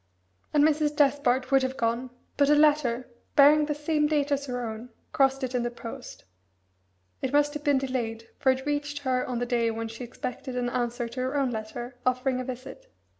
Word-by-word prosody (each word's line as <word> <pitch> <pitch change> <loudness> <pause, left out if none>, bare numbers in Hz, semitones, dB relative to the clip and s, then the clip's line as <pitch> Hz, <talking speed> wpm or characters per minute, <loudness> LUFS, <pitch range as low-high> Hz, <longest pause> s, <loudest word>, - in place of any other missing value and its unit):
And 295 -1 +4
Mrs. 300 -1 +2
Despard 275 -3 +2
would 270 0 +5
have 260 0 -2
gone, 235 +2 -1 0.3
but 285 -1 +3
a 295 - +6
letter, 290 -5 +3 0.3
bearing 295 +1 +6
the 295 - -1
same 300 0 +1
date 295 -1 0
as 280 0 0
her 245 -1 -3
own, 220 +2 -7 0.2
crossed 270 -3 +2
it 255 0 -2
in 250 - +1
the 240 - -1
post; 240 +2 -9 1.0
it 260 - -1
must 290 0 +3
have 295 -1 -6
been 285 -2 +3
delayed, 235 -4 -3
for 265 - +4
it 260 +1 -3
reached 290 0 -2
her 255 -2 +1
on 250 - -3
the 245 - -1
day 240 -1 +1
when 225 0 -3
she 225 +2 -8
expected 250 +2 -6
an 245 -1 -1
answer 240 -1 -2
to 235 +2 -7
her 260 +3 -1
own 270 -3 +1
letter, 240 +3 -6
offering 255 0 +1
a - - -2
visit. 260 - -8
260 Hz, 205 wpm, -27 LUFS, 245-290 Hz, 1.0 s, a